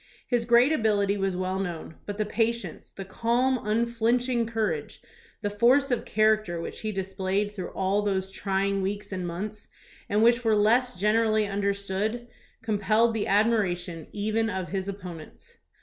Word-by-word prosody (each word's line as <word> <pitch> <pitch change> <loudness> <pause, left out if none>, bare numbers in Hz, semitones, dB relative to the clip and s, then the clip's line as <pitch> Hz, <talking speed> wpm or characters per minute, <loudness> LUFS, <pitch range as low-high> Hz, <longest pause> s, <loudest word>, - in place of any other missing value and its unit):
His 240 -2 0
great 240 +4 +5
ability 205 -7 +2
was 195 -2 -1
well 185 +1 -2
known, 170 -4 -4
but 205 0 -4
the 215 - 0
patience, 230 +2 -2
the 195 - -8
calm, 240 +6 +1
unflinch 235 +3 +1
ing 235 -2 +1
courage, 210 -10 -2 0.4
the 205 - 0
force 255 +6 +3
of 245 - 0
character 215 -5 +2
which 165 - -6
he 215 - -3
displayed 195 +1 -2
through 190 -4 -6
all 195 +2 +1
those 190 -2 -1
trying 195 0 -1
weeks 205 +2 -3
and 185 -2 -3
months, 205 +5 -6 0.4
and 210 +2 +2
which 240 +1 +4
were 220 -2 +3
less 225 +1 +2
generally 215 +1 +3
understood, 200 +3 -2 0.4
compelled 220 +1 +2
the 220 -2 -1
admira 205 -3 +2
tion 170 -3 -8
even 215 +2 0
of 190 -3 -3
his 190 -1 -3
opponents. 180 -5 -9
205 Hz, 160 wpm, -27 LUFS, 190-225 Hz, 0.4 s, great